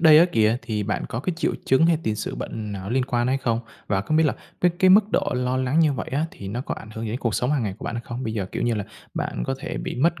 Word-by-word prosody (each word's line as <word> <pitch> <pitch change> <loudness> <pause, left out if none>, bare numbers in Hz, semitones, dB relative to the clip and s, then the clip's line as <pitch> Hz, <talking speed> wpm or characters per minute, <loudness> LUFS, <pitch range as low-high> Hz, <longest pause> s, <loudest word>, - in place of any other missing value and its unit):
đây 155 -2 +8
á 170 - +8
kìa 110 -2 +4
thì 110 -4 -2
bạn 105 +1 -2
có 115 - -3
cái 180 +7 -1
triệu - - +1
chứng 135 +5 +4
hay 165 -2 +3
tiền 110 -5 -1
sử - - -3
bệnh 105 -2 -5
nào 95 - -5
nó 100 - -5
liên 130 0 +2
quan 120 -2 0
hay 130 +1 +2
không? 115 -3 0 0.3
Và 95 -2 +1
không 155 +10 0
biết 160 - +5
là 145 - +1 0.3
với 180 - +5
cái 185 -1 +6
mức 205 +2 +8
độ - - +1
lo 125 +1 0
lắng 130 +4 +1
như 155 -3 +4
vậy 125 - -4
á 150 +4 +1
thì 100 - -8
nó 120 +5 -3
có - - -3
ảnh 110 - -10
hưởng 110 +1 -4
gì 110 - -3
đến 120 - -2
cuộc 115 -4 0
sống 125 - +1
hằng 140 -5 +1
ngày 100 -3 -2
của - - -9
bạn - - -3
hay 115 - -3
không? 120 +2 -5
Bây 110 - -2
giờ, 100 -4 -2
kiểu - - -2
như 120 -1 +2
là, 105 -2 -2 0.3
bạn - - -2
có - - 0
thể - - -5
bị - - -3
mất 170 +6 +2
125 Hz, 335 wpm, -24 LUFS, 110-150 Hz, 0.3 s, đây